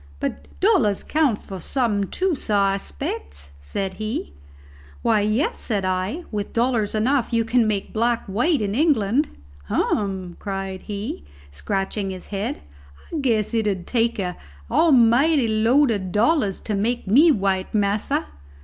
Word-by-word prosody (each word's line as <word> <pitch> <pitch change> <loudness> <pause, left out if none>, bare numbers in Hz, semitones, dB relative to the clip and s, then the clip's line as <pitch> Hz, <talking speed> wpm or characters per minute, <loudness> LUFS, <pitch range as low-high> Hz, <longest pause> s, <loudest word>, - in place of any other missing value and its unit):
"But 70 - -4
dollars 205 - +3
count 290 -9 +1
for 190 -1 -7
something 205 -1 0
too, 375 -1 0
sah, 205 -8 +1
I 195 - 0
spects?" 70 - -7
said 190 - -3
he. 215 - -3 0.7
"Why, 215 - +3
yes," 215 +8 0
said 205 -5 -2
I, 185 - -1
"with 205 -2 -4
dollars 230 -3 +1
enough 250 +4 +1
you 230 -1 +2
can 230 -1 +3
make 205 -2 -2
black 235 +1 +1
white 245 - +1
in 200 -1 -1
England." 275 -1 +2 0.4
"Hum!" 190 - -1
cried 195 -2 -4
he, 205 - -5 0.3
scratching 195 - -2
his 185 -1 -7
head. 195 - -3 0.5
"I - - -1
guess 235 -7 0
it 225 -2 +1
'ud 185 -4 -2
take 235 -1 +1
an 180 -3 -3 0.3
almighty 270 -1 +4
load 230 +5 +3
of 190 -4 -2
dollars 215 - +2
to 215 - -3
make 225 +5 -1
me 280 - +6
white, 195 -6 0
massa." 205 0 +1
210 Hz, 150 wpm, -23 LUFS, 195-240 Hz, 0.7 s, me